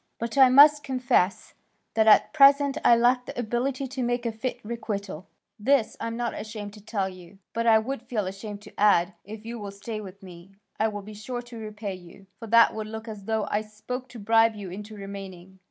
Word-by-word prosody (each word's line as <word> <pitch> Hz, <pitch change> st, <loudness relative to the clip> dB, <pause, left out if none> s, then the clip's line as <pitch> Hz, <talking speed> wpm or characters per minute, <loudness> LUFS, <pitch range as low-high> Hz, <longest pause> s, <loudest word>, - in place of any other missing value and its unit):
But 230 Hz, +1 st, -4 dB
I 265 Hz, -2 st, +7 dB
must 290 Hz, +3 st, +7 dB
confess 250 Hz, -8 st, 0 dB, 0.4 s
that 220 Hz, -1 st, +2 dB
at 215 Hz, -, +6 dB
present 280 Hz, -1 st, +6 dB
I 235 Hz, -, +7 dB
lack 245 Hz, +2 st, +2 dB
the -, -, -8 dB
ability 250 Hz, +4 st, -2 dB
to 265 Hz, 0 st, -5 dB
make 245 Hz, 0 st, -1 dB
a 230 Hz, -, 0 dB
fit 240 Hz, +3 st, -4 dB
requital. 200 Hz, -6 st, -5 dB, 0.3 s
This 250 Hz, +1 st, +2 dB
I -, -, -3 dB
am 230 Hz, 0 st, -4 dB
not 240 Hz, -1 st, -2 dB
ashamed 210 Hz, -2 st, -7 dB
to 210 Hz, -, -13 dB
tell 205 Hz, -3 st, -2 dB
you, 185 Hz, 0 st, -12 dB, 0.2 s
but 230 Hz, +1 st, -1 dB
I 225 Hz, -1 st, +7 dB
would 230 Hz, +3 st, -3 dB
feel 235 Hz, -4 st, -3 dB
ashamed 200 Hz, +2 st, -7 dB
to 210 Hz, -, -14 dB
add, 200 Hz, -3 st, +4 dB
'If 215 Hz, +2 st, -10 dB
you 235 Hz, 0 st, -6 dB
will 205 Hz, -1 st, -6 dB
stay 210 Hz, +2 st, -6 dB
with 195 Hz, 0 st, -11 dB
me, 180 Hz, +1 st, -13 dB, 0.2 s
I 220 Hz, -, +3 dB
will 205 Hz, -2 st, -5 dB
be 215 Hz, +2 st, -10 dB
sure 240 Hz, +4 st, -6 dB
to 240 Hz, -1 st, -11 dB
repay 210 Hz, -2 st, -6 dB
you,' 185 Hz, +1 st, -13 dB
for 230 Hz, -, -8 dB
that 230 Hz, +1 st, +6 dB
would 215 Hz, -1 st, -5 dB
look 220 Hz, +1 st, -7 dB
as 210 Hz, -3 st, -8 dB
though 220 Hz, 0 st, -1 dB
I 210 Hz, -, +1 dB
spoke 220 Hz, +4 st, -7 dB
to 245 Hz, -, -11 dB
bribe 225 Hz, +1 st, +3 dB
you 200 Hz, -4 st, -7 dB
into 210 Hz, +3 st, -8 dB
remaining. 190 Hz, -2 st, -9 dB
220 Hz, 220 wpm, -26 LUFS, 200-240 Hz, 0.4 s, I